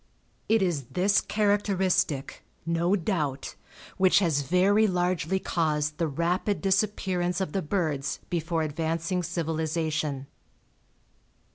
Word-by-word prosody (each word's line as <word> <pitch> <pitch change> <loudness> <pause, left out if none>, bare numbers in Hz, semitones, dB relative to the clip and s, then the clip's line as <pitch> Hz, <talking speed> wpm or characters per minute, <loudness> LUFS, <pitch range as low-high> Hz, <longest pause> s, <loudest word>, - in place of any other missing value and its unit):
It 220 -2 +4
is 165 -8 -1
this 195 +3 +3
characteristic, 195 -8 0 0.2
no 170 +3 +1
doubt, 155 -7 -2 0.4
which 185 -1 +4
has 165 -7 +2
very 190 +9 +3
largely 180 -1 0
caused 150 -4 -1
the 165 - +1
rapid 175 +7 -1
disappearance 190 -3 0
of 190 -5 -2
the 195 - -1
birds 150 -5 -2
before 165 -1 -1
advancing 165 +4 -1
civilization. 160 -4 -2
170 Hz, 105 wpm, -27 LUFS, 155-190 Hz, 0.4 s, It